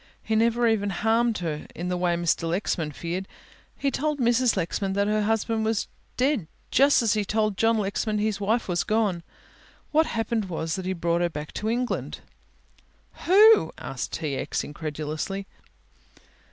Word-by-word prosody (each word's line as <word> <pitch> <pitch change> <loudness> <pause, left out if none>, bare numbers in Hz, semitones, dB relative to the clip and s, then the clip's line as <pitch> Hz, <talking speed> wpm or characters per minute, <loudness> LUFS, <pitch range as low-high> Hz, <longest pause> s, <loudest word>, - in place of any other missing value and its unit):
He 220 - -1
never 235 +2 +3
even 210 -3 +1
harmed 225 +3 +1
her 150 -2 -4
in 175 +2 -4
the 180 - 0
way 175 -1 +1
Mr. 170 -1 0
Lexman 170 -3 -1
feared. 175 +5 -4 0.5
He 275 - 0
told 300 +3 -1
Mrs. 240 -2 +3
Lexman 190 +2 -1
that 200 +1 +1
her 210 +1 +1
husband 225 +1 0
was 220 -1 0 0.3
dead 255 - +1 0.2
just 275 -1 +5
as 225 - +3
he 210 -1 0
told 215 0 0
John 225 +3 +2
Lexman 210 +1 -1
his 210 -1 -1
wife 225 +4 +1
was 175 -2 0
gone. 210 -5 0 0.7
What 315 +1 +3
happened 225 -1 -1
was 165 -3 -3
that 190 - -5
he 190 - 0
brought 170 -1 0
her 175 - +2
back 150 -2 -7
to 215 - -2
England 245 +2 -2 0.5
" - - -35
"Who?" 425 +5 +7
asked - - -5
T. 150 -4 -2
X., - - -2
incredulously. 155 +5 -4
210 Hz, 165 wpm, -25 LUFS, 175-230 Hz, 0.7 s, Who